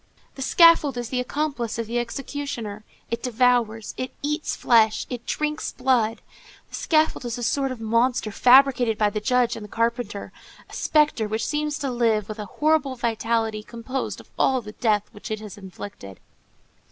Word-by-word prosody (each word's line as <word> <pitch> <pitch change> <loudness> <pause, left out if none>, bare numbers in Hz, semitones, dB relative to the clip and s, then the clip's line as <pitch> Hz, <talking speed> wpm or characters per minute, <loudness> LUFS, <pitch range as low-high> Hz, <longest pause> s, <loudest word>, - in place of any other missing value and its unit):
The 270 - -9
scaffold 310 -3 +5
is 240 -1 -4
the 255 - -1
accomplice 255 -3 -2
of 230 - -2
the 235 +2 -1
executioner; 240 -4 -5 0.3
it 235 - -2
devours, 240 -3 +1
it 255 - -3
eats 300 +1 -1
flesh, 225 -2 +3
it 240 -1 -6
drinks 300 0 -2
blood; 245 -4 +1 0.5
the - - -24
scaffold 310 -4 +1
is 240 -1 -4
a 240 - -5
sort 270 +2 0
of 255 - -6
monster 230 0 +1
fabricated 250 -1 +5
by 210 -1 +2
the 215 0 -3
judge 250 0 +2
and 220 - -7
the - - -8
carpenter, 230 -3 -2 0.4
a - - -16
spectre 300 -8 +2
which 220 +2 -2
seems 300 -1 -1
to 275 -3 -3
live 225 -4 +1
with 215 0 -7
a 210 - -4
horrible 295 +2 +1
vitality 225 -2 -1
composed 235 +4 -5
of - - -16
all 260 -1 +3
the 210 -3 -9
death 210 -2 +1
which 210 - -10
it 215 -1 -3
has 210 -3 -9
inflicted. 190 - -10
240 Hz, 175 wpm, -24 LUFS, 220-265 Hz, 0.5 s, scaffold